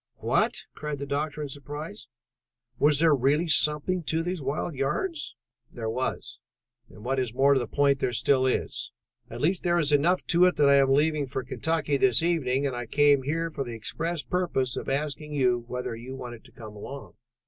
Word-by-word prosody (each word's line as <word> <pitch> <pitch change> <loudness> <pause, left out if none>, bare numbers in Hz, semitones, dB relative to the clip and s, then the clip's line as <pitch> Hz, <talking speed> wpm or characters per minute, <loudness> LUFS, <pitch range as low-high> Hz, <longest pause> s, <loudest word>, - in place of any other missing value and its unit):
"What?" - - 0
cried 150 -1 -5
the 140 - -5
doctor 150 +2 -2
in 145 - -5
surprise. 140 -5 -8 0.7
"Was 145 -1 +4
there 160 -1 +5
really 145 +5 +2
something 150 +4 +2
to 160 +2 0
those 175 -1 -3
wild 140 +5 -2
yarns?" 150 - -2 0.3
"There 110 -2 -4
was, 130 +3 -4 0.5
and 105 - -14
what 135 +1 0
is 125 -2 -3
more 140 +2 +5
to 135 - +3
the 120 - -3
point, 140 +2 +2
there 125 - 0
still 130 +1 +2
is. 130 - -2 0.4
At - - -7
least 180 +4 +1
there 175 -1 +1
is 150 -4 +3
enough 165 +6 +2
to 175 +1 +4
it 180 - +3
that 145 -1 +4
I 140 - +6
am 135 -1 +4
leaving 150 0 +2
for 130 0 -4
Kentucky 155 +2 -1
this 130 +2 +4
evening, 145 -6 +1
and 135 -3 -1
I 120 -1 -5
came 145 0 +4
here 165 +5 -2
for 140 -3 -3
the 120 -3 -7
express 165 +8 -3
purpose 170 -9 -1
of - - -4
asking 150 +2 -3
you 125 -3 +1
whether 125 -1 -4
you 125 +3 -8
wanted 120 -3 -8
to 125 - -17
come 110 -3 -11
along. 135 +7 -9
140 Hz, 200 wpm, -27 LUFS, 130-155 Hz, 0.7 s, I